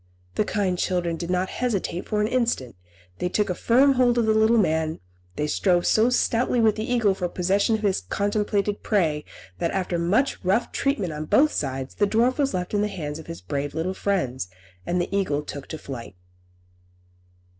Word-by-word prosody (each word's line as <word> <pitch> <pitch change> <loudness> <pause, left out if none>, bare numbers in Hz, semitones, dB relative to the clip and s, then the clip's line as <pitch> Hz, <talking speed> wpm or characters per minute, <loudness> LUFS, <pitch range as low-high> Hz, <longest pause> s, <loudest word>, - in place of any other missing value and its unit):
The - - +1
kind 190 -4 -1
children 175 -3 0
did 170 +1 -5
not 180 +1 0
hesitate 200 -7 -2
for 210 -1 +1
an 210 - +2
instant. 230 - -1 0.4
They 180 - -1
took 205 0 0
a - - +1
firm 260 +9 +4
hold 245 -2 +3
of 235 - +3
the 220 - +3
little 220 +2 +4
man, 160 -5 +1 0.4
they 150 - -1
strove 175 +3 +2
so 220 +3 +4
stoutly 245 0 +1
with 220 -2 +4
the 220 +2 -4
eagle 230 -5 +3
for 180 -2 -3
possession 195 +5 +1
of 220 - -5
his 195 -2 +1
contemplated 205 - -1
prey, 160 -8 +1 0.3
that, - - 0
after 185 -2 -1
much 205 +12 +1
rough 195 +6 +1
treatment 240 - -1
on 150 +1 -4
both 295 - +4
sides, 135 -1 -3
the 205 - +1
dwarf 240 +6 +2
was 275 -2 +1
left 180 +1 -3
in 205 - +2
the 210 - +1
hands 155 -6 -5
of 160 - -11
his 165 0 -7
brave 145 0 -3
little 170 +4 -1
friends, 155 - -1 0.4
and 180 - +1
the 175 +3 -2
eagle 150 -7 0
took 140 -2 -7
to 160 - -6
flight. 120 -9 -8
190 Hz, 195 wpm, -24 LUFS, 165-220 Hz, 0.4 s, firm